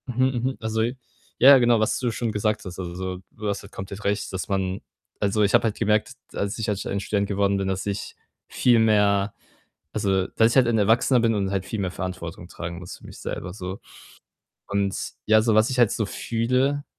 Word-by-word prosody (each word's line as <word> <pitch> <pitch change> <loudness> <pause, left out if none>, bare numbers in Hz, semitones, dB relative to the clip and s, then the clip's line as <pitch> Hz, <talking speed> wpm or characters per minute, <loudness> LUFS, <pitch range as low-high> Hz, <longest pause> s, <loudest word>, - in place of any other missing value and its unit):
Mhm, 130 +1 +1 0.2
mhm. 130 +1 -1
Also 110 0 -1 0.6
ja, 135 +2 +9
genau, 120 -2 +4
was 110 - +1
du 125 -2 0
schon 115 0 -2
gesagt 105 +1 -1
hast. 90 -1 -7
Also, 90 +1 -4
du 105 - -6
hast 100 -1 -2
halt 100 - -13
komplett 100 +2 -7
recht, 105 +1 -1
dass 95 - -3
man 95 -1 -1 0.4
also, 105 +1 +1
ich 100 - +2
habe - - +5
halt 110 - -1
gemerkt, 105 +1 +1 0.2
dass 100 0 -3
ich 110 -1 -3
halt 105 -2 -1
ein 100 - -1
Student 100 0 -1
geworden 100 0 +1
bin, 95 0 -1
dass 95 0 -2
ich 100 0 -4 0.3
viel 120 -2 +3
mehr 105 -2 +3 0.6
also, 95 -3 +1
dass 115 +1 +3
ich - - -2
halt 130 -2 +5
ein 115 -1 +2
Erwachsener 115 +5 +3
bin 115 -1 +2
und 100 -2 -1
halt 95 -2 -1
viel 110 - -4
mehr 95 -2 -1
Verantwortung 90 -2 -6
tragen 85 -1 -6
muss 90 -1 -9
für - - -17
mich - - -11
selber, 90 - -5
so 95 -1 -6 0.9
und, 100 -1 0 0.3
ja, 110 0 +5
so 110 -1 +2
was 110 +2 +4
ich 130 - -1
halt 120 -4 +6
so 110 - -1
fühle, 125 +7 0
105 Hz, 210 wpm, -24 LUFS, 95-115 Hz, 0.9 s, ja